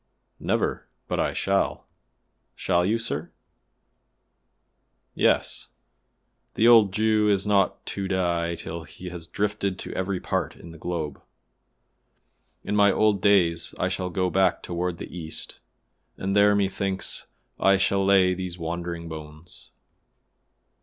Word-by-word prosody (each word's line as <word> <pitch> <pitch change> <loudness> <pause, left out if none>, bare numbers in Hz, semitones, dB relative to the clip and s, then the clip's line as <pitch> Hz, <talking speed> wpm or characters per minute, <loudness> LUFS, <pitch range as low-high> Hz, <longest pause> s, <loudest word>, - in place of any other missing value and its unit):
"Never, - - -1 0.2
but - - -2
I - - +1
shall." - - 0 0.7
"Shall 85 0 +1
you, 105 +5 +2
sir?" 115 0 -3 1.8
"Yes; - - +1 0.9
the 115 - +4
old 115 -5 +7
Jew 110 +1 +2
is 100 -1 +2
not 100 -1 +1
to 100 -1 -3
die 85 -3 0
till 85 0 -6
he 90 +3 -9
has 85 -2 -7
drifted 100 -1 -1
to - - -6
every 95 0 -2
part - - -2
in 85 - -12
the 85 - -13
globe. 80 -5 -4 1.4
In 105 - -2
my 100 -1 +5
old 105 -2 +2
days 95 -5 +3
I - - 0
shall 90 -1 -2
go 90 0 0
back 95 -1 +2
toward 90 0 -2
the - - -8
East, 80 -2 -5 0.6
and 95 +1 -2
there 105 0 +5
methinks 95 -1 -1 0.3
I 95 0 +5
shall 100 0 +2
lay 95 -1 +4
these 90 -1 -5
wandering 85 0 -4
bones." 80 +1 -10
95 Hz, 130 wpm, -25 LUFS, 85-100 Hz, 1.8 s, old